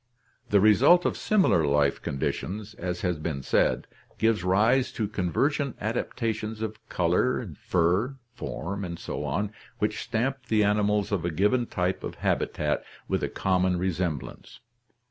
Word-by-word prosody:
The 100 - +5
result 130 - +6
of - - +1
similar 190 - +3
life 70 -1 +2
conditions, 100 +9 -3
as 90 -3 -4
has 90 -4 -1
been 75 -3 -3
said, - - +2 0.3
gives 110 -4 +2
rise 110 +8 +3
to 110 -3 -1
convergent 130 - 0
adaptations 110 0 -2
of 110 -1 -4
color, 90 +8 +1 0.2
fur, 90 +10 +2 0.2
form, 100 -5 -5
and 85 -2 -5
so - - -5
on, 100 +4 -1 0.3
which - - -1
stamp 130 +3 -2
the 110 -1 +3
animals 105 0 +2
of 95 -5 0
a 85 - 0
given 105 +9 +2
type 90 +1 -1
of - - -5
habitat - - 0 0.2
with - - 0
a - - -1
common 90 -1 +1
re 95 +2 0
semblance. 85 -5 -4
100 Hz, 145 wpm, -27 LUFS, 90-115 Hz, 0.3 s, result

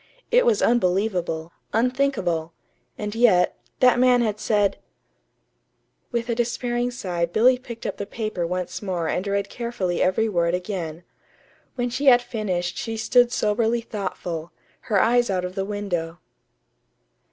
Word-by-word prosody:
It - - +4
was 455 -3 +3
unbelievable, 180 -6 +1 0.2
unthinkable. 225 -10 0 0.4
And 210 -1 -4
yet, 225 -6 +4 0.3
that 250 -1 +5
man 250 -1 +5
had 210 -2 -1
said 205 -2 +1 1.3
With 235 -1 -2
a 235 - 0
despairing 240 +1 -1
sigh 180 -8 -2
Billy 245 +8 +4
picked 235 -2 -9
up - - -3
the 200 - -5
paper 215 -6 -3
once 180 0 -3
more 180 -5 -2
and 185 +5 -1
read 200 0 0
carefully 235 -7 -3
every 190 +5 +2
word 170 -4 +1
again. 180 -3 -5 0.7
When 245 -1 -1
she 275 +4 -2
had 245 -2 +7
finished 190 -7 -3
she 225 -1 -4
stood 245 +2 +4
soberly 225 +1 +1
thoughtful, 180 -6 -5 0.4
her 205 -3 +3
eyes 240 +2 +3
out 185 -2 0
of 180 - -5
the 195 0 -2
window. 180 -5 -3
210 Hz, 140 wpm, -24 LUFS, 180-240 Hz, 1.3 s, had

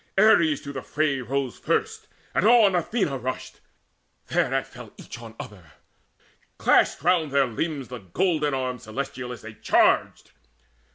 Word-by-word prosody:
Ares 170 -8 +5
to 140 - -8
the 135 - -5
fray 145 -2 -1
Rose 130 +1 -3
first, 445 -1 -1 0.3
and - - +2
on 225 -4 +6
Athena 175 - -1
rushed. 130 +1 -5 0.7
Thereat - - +1
Fell - - -12
each - - -10
on 115 -1 -11
other: 90 - -11 0.8
clashed - - +3
around 170 -3 +2
their 140 0 +3
limbs 135 +3 -4
The 125 -1 -7
golden 150 - 0
arms 125 -2 -4
celestial 130 +2 -5
as 120 - -9
they 110 0 -9
charged. - - +1
140 Hz, 140 wpm, -25 LUFS, 125-170 Hz, 0.8 s, on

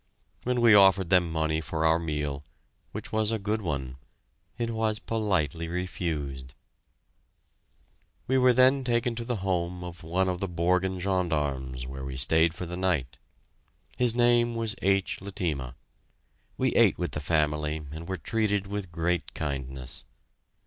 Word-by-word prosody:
When 125 0 +1
we 115 -2 +7
offered 95 -2 +6
them 90 -3 +4
money 80 -1 0
for 80 0 -2
our 80 +1 +4
meal 75 -3 -3 0.5
which - - -7
was 110 -1 +1
a 115 - +1
good 105 +1 -2
one 70 -7 -3 0.6
it 115 -1 -2
was 110 -1 0
politely 90 - -1
refused. 75 -7 -4 1.7
We 130 +1 +2
were 125 0 +6
then 130 +2 +4
taken 120 -1 +1
to 115 0 -5
the 120 +1 -2
home 90 -1 -1
of 90 -1 -8
one 90 +4 0
of 90 -1 -1
the 95 -1 -3
Borgen 90 +2 +1
gendarmes 75 -9 -1
where 65 +1 -7
we 65 -1 -5
stayed 80 +5 +4
for 90 - -5
the 85 +1 -5
night. 85 -9 -1 0.8
His 120 -2 +2
name 120 -1 +3
was 115 -2 -1
H. 95 0 +1
Letema. 85 - -3 0.8
We - - +1
ate - - +5
with - - -2
the 75 - -4
family 75 0 0
and 80 +2 -7
were 95 - -2
treated 105 -2 0
with 100 -2 -5
great 85 +1 -1
kindness. 65 -4 -4
90 Hz, 150 wpm, -28 LUFS, 75-105 Hz, 1.7 s, we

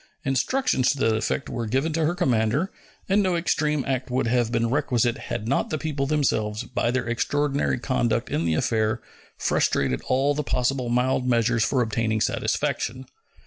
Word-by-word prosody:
Instructions 135 - +1
to 145 - +1
that 115 -4 +2
effect 110 +5 -1
were 115 -2 -3
given 135 +8 0
to 160 0 +1
her 170 +3 0
commander; 130 - +1 0.4
and 200 +2 +3
no 185 -3 +1
extreme 150 -4 0
act 130 -1 -2
would 125 +1 0
have 120 -1 +1
been 115 -1 +1
requisite 120 -3 +1
had 115 -2 -3
not 135 - 0
the 155 - -1
people 145 -3 -2
themselves, 110 -8 0
by 120 -1 -1
their 125 0 -1
extraordinary 140 +5 0
conduct 120 -2 0
in 80 - 0
the 80 -1 +1
affair, 110 +5 +1 0.4
frustrated 65 -2 +1
all 135 +3 +2
the 150 - -1
possible 125 -2 -1
mild 125 +1 +1
measures 115 -1 +2
for 130 0 +2
obtaining 110 -1 -1
satisfaction. 130 +4 -1
125 Hz, 170 wpm, -24 LUFS, 115-145 Hz, 0.4 s, and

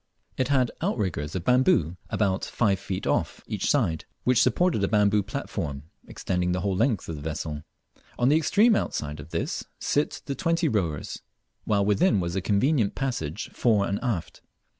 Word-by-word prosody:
It 130 - 0
had 130 -3 +2
outriggers 85 - -2
of 90 - -2
bamboo 125 - +3
about 100 -3 0
five 100 -5 +1
feet 95 -1 -4
off - - -1
each - - -2
side, 80 -2 +1 0.2
which 125 0 +4
supported 175 - +2
a - - +3
bamboo 105 0 +3
platform 95 - -4 0.2
extending 90 -1 -1
the 90 - -1
whole 95 0 0
length 115 0 +1
of 80 - -5
the - - -8
vessel. 75 0 -4 0.6
On 120 - +2
the 145 - +5
extreme 210 +8 +4
outside 75 - -2
of - - -10
this 85 0 -2
sit 145 +1 -1
the 140 - -2
twenty 165 +1 +1
rowers, 90 - -2 0.4
while 100 -2 +2
within 105 - +3
was 85 0 -2
a 95 - 0
convenient 105 - +2
passage 110 - -3
fore 105 -5 +2
and 100 +1 -1
aft. 90 - -3
100 Hz, 170 wpm, -26 LUFS, 85-130 Hz, 0.6 s, the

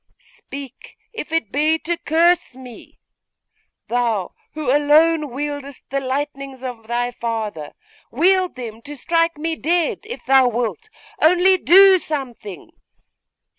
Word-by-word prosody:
Speak, 275 -2 -12 0.2
if 445 -9 -7
it 325 -11 -1
be 305 +3 +2
to 330 +2 -2
curse 335 -2 +1
me! 255 -2 -13 0.9
Thou 230 -6 -1 0.2
who 290 -3 0
alone 300 +1 +3
wieldest 285 0 -6
the 275 - 0
lightnings 275 0 -4
of 240 -4 -7
thy 240 +1 -1
father, 220 -10 -5 0.4
wield 365 +7 +2
them 230 -3 -8
to 295 +4 -9
strike 330 +3 0
me 325 +2 -2
dead, 335 +1 0
if 470 +3 -8
thou 265 -1 +5
wilt; 245 - -3 0.3
only 360 +4 +5
do 380 +2 +6
something! 240 - -6
285 Hz, 125 wpm, -20 LUFS, 245-330 Hz, 0.9 s, do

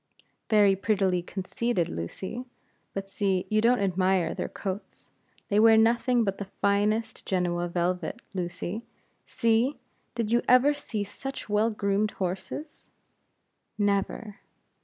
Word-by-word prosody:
"Very 205 -3 +5
prettily 190 -3 +1
conceited, 190 +2 -2
Lucy. 185 - -5 0.5
But 195 0 -3
see, 195 -2 0
you 215 0 +3
don't 240 +2 +4
admire 190 -2 +1
their - - -4
coats; 195 +1 -6 0.4
they 205 - +3
wear 225 0 +7
nothing 235 +2 +3
but 195 -2 -2
the 200 - -3
finest 210 +3 +1
Genoa 175 -2 0
velvet, 175 +4 -1
Lucy. 180 +3 -4 0.4
See! 230 +5 +2 0.4
did 230 -2 -1
you 235 - +4
ever 255 +4 +6
see 230 -7 -4
such 270 +5 -7
well 210 +2 +3
groomed 205 -1 0
horses?" 190 - -5 0.9
"Never!" 205 +1 -1
205 Hz, 120 wpm, -27 LUFS, 190-225 Hz, 0.9 s, wear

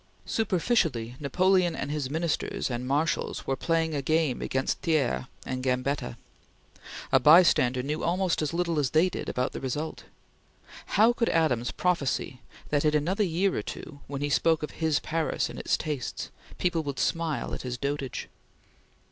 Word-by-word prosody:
Superficially 170 - 0
Napoleon 180 +4 +2
and 145 - -3
his 145 -3 -2
Ministers 160 -3 -1
and 120 +1 -3
marshals 150 +5 0
were 135 - 0
playing 165 +3 0
a 145 - -1
game 155 -2 +1
against 130 0 -1
Thiers 155 -7 +1 0.2
and 130 0 -3
Gambetta. 125 -1 -1 0.9
A 135 - +6
bystander 130 -4 +6
knew 150 +3 -2
almost 180 -1 +1
as 155 - -1
little 170 -2 0
as 140 -3 +1
they 160 +6 +3
did - - -5
about 125 +1 -1
the - - -6
result. 145 +4 -4 0.9
How 225 +3 +6
could 230 -1 0
Adams 125 -7 +2
prophesy 145 -7 -1 0.3
that 145 -1 +1
in 150 0 +3
another 180 +8 +1
year 185 +2 +1
or - - -1
two, 140 - -8
when 140 -1 -5
he 145 - 0
spoke 160 +2 +3
of 150 - -4
his 160 -2 +1
Paris 160 0 -1
and - - -8
its - - +1
tastes, 150 -5 -4 0.3
people 175 -2 +1
would 140 -3 -5
smile 165 -3 -1
at - - -4
his 125 -1 -4
dotage? 140 0 -3
150 Hz, 165 wpm, -28 LUFS, 135-170 Hz, 0.9 s, A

